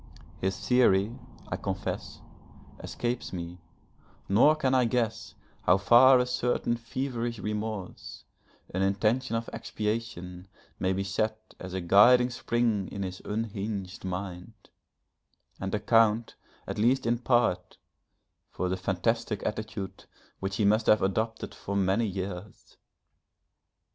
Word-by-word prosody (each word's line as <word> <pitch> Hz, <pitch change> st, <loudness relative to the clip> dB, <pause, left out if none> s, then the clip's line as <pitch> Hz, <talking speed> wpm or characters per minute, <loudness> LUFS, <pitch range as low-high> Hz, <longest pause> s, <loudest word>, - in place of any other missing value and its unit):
His 95 Hz, +1 st, -2 dB
theory, 115 Hz, -4 st, +4 dB, 0.4 s
I -, -, -2 dB
confess, -, -, -4 dB, 0.6 s
escapes 120 Hz, 0 st, -3 dB
me, 90 Hz, -1 st, -6 dB, 0.7 s
nor 120 Hz, +10 st, +5 dB
can 135 Hz, -4 st, 0 dB
I 130 Hz, -1 st, +4 dB
guess 115 Hz, -2 st, -1 dB, 0.3 s
how 90 Hz, -, +4 dB
far 120 Hz, +6 st, +7 dB
a 125 Hz, -, +2 dB
certain 125 Hz, -1 st, 0 dB
feverish 120 Hz, 0 st, -3 dB
remorse, 105 Hz, -1 st, -5 dB, 0.5 s
an 95 Hz, -, -1 dB
intention 110 Hz, +6 st, +1 dB
of 115 Hz, 0 st, -2 dB
expiation 105 Hz, -5 st, -4 dB, 0.3 s
may 95 Hz, 0 st, +1 dB
be 95 Hz, +1 st, -1 dB
set 110 Hz, +3 st, -3 dB
as 95 Hz, 0 st, -7 dB
a 95 Hz, -, -2 dB
guiding 120 Hz, +8 st, +6 dB
spring 115 Hz, -5 st, 0 dB
in 100 Hz, -, -5 dB
his 90 Hz, -1 st, -6 dB
unhinged 105 Hz, -2 st, -4 dB
mind, 90 Hz, +2 st, -5 dB, 1.1 s
and 95 Hz, +2 st, -2 dB
account, 115 Hz, +1 st, +3 dB, 0.3 s
at -, -, -5 dB
least 125 Hz, +5 st, +3 dB
in 120 Hz, 0 st, +1 dB
part, 120 Hz, -7 st, +1 dB, 0.7 s
for 90 Hz, -, -3 dB
the 95 Hz, -, -1 dB
fantastic 105 Hz, +4 st, -1 dB
attitude 105 Hz, -2 st, -5 dB, 0.3 s
which 95 Hz, 0 st, -3 dB
he 105 Hz, -, +1 dB
must 110 Hz, +2 st, +3 dB
have 105 Hz, -, +5 dB
adopted 110 Hz, +4 st, -1 dB
for 100 Hz, -, -5 dB
many 100 Hz, +4 st, +2 dB
years. 95 Hz, 0 st, -7 dB
105 Hz, 125 wpm, -28 LUFS, 95-115 Hz, 1.1 s, far